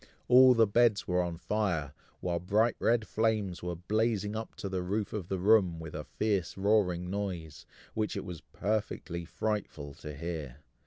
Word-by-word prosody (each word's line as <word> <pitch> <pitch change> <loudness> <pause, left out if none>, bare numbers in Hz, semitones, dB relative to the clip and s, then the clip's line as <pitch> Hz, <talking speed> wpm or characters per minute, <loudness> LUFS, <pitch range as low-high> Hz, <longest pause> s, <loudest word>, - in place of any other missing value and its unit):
all 125 0 +8
the 115 -1 +6
beds 110 0 +3
were 90 0 +2
on 85 -2 -3
fire, 85 -8 -1 0.3
while 85 -1 -1
bright 105 +6 +2
red 115 -1 +2
flames 110 -5 0
were 90 0 -3
blazing 105 +3 0
up 110 0 -5
to - - -5
the 95 -1 -2
roof 100 +3 -2
of 100 -5 -4
the 95 - -2
room, 95 -3 +4
with 80 -1 -8
a 75 -1 -5
fierce 100 -6 -1
roaring 95 -3 +2
noise, 90 -7 -4 0.3
which 110 -1 -1
it - - -4
was 90 -4 -7
perfectly 100 -4 -2
frightful 85 -8 -3
to 75 +1 -8
hear. 75 -4 -5
95 Hz, 170 wpm, -31 LUFS, 85-110 Hz, 0.3 s, all